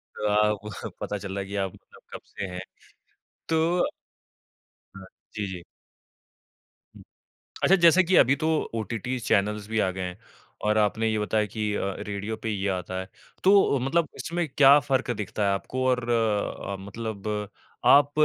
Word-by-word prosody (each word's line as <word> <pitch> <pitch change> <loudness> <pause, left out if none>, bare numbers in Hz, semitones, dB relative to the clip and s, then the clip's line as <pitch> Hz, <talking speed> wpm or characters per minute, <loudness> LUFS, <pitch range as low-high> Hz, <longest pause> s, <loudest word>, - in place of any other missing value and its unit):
अ, 105 0 +1 0.5
पता 105 - -3
चल 95 -1 -6
रहा - - -1
है - - -8
कि 100 +1 -5
आप 95 -2 -1
मतलब - - -19
कब - - -7 0.2
से - - -3
हैं। 90 0 -6 0.9
तो 165 +2 +2 1.1
हाँ। 95 - -10 0.3
जी, 105 -1 -2
जी। 90 -2 -7 2.0
अच्छा, 195 - +6
जैसा 170 0 +6
कि 185 +1 +1
अभी 135 +3 +6
तो 155 - -2 0.3
ओटीटी 115 +3 -3
चैनल्स 105 -1 0
भी 110 0 0
आ 95 - +2
गए 95 - -6
हैं, 90 +1 -5 0.5
और 105 0 +2
आपने 110 +1 +2
ये 110 - 0
बताया 105 0 +1
कि 105 +1 -3
अ, 100 -1 -2
रेडियो 105 +2 -4
पे 110 - -1
ये 100 -1 -1
आता 95 0 -3
है। 95 - -6 0.4
तो 195 -7 +5
मतलब 155 +6 +1
इसमें 170 0 -2
क्या 140 0 +8
फ़र्क 135 -3 0
दिखता 105 +1 -3
है 100 - +2
आपको 130 +6 -3
और 125 -1 +1
अ, 110 -3 0
मतलब 105 +1 -6 0.6
आप 140 +3 +6
110 Hz, 160 wpm, -26 LUFS, 100-135 Hz, 2.0 s, क्या